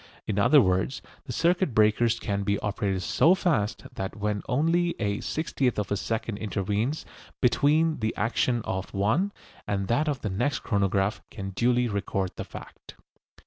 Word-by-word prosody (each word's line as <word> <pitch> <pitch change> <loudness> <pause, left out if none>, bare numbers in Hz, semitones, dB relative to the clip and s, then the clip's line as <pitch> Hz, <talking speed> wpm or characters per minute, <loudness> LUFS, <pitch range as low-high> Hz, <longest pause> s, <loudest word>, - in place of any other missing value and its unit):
In 105 -1 -1
other 140 +7 +6
words, 95 +7 0 0.2
the - - -6
circuit 170 - +1
breakers 110 +2 +3
can 100 -1 -2
be 100 0 0
operated 100 -2 -1
so 175 +4 +4
fast 130 - 0
that 95 0 -4
when 105 -1 -2
only 165 +6 +2
a 100 -2 -1
sixtieth 140 -5 -1
of 105 -1 -2
a - - +2
second 110 +1 -3
intervenes 105 +7 -2 0.3
between 155 +5 +3
the 110 -1 -1
action 115 +1 +1
of 95 +2 -4
one 110 - +1 0.4
and 100 -1 -1
that 150 +7 +2
of 140 -3 -2
the 105 - -2
next 120 +6 -1
the - - -14
chronograph 100 -1 +1
can 95 0 -6
duly 120 +4 +2
record 100 -3 -2
the - - -4
fact. - - -11
110 Hz, 165 wpm, -27 LUFS, 100-135 Hz, 0.4 s, other